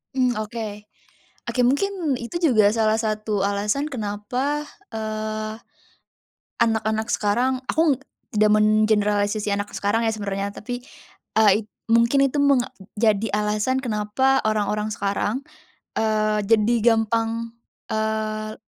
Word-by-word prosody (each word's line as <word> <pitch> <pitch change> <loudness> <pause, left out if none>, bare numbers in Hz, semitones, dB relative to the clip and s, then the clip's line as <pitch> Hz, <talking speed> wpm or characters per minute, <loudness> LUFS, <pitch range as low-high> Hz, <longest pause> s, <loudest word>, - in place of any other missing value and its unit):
Mmm, 250 -2 +2
oke. 215 -1 -5 0.6
Oke, 250 - -1
mungkin 300 +2 +1
itu 340 +9 -5
juga 215 -2 +4
salah 220 -1 +2
satu 215 -2 -1
alasan 210 +8 0
kenapa, 255 +4 -2 0.2
eee, 215 0 -4 1.0
anak-anak 220 -1 +1
sekarang 250 +5 +1
aku 305 -5 +2 0.3
tidak 215 0 +4
mengeneralisasi 210 -1 +2
anak 205 0 -2
sekarang 205 +3 +1
ya 225 - +1
sebenarnya, 200 -1 -3
tapi, 245 +4 -6 0.6
eee, 215 0 +4 0.2
mungkin 235 +4 +4
itu 280 +2 0
menjadi 225 -5 +1
alasan 210 +5 0
kenapa 240 +4 +1
orang-orang 210 0 0
sekarang, 210 +5 -2 0.5
eee, 215 -1 +1
jadi 220 +2 +3 0.2
gampang, 225 +1 -1 0.3
eee 215 0 -2
220 Hz, 105 wpm, -23 LUFS, 210-240 Hz, 1.0 s, juga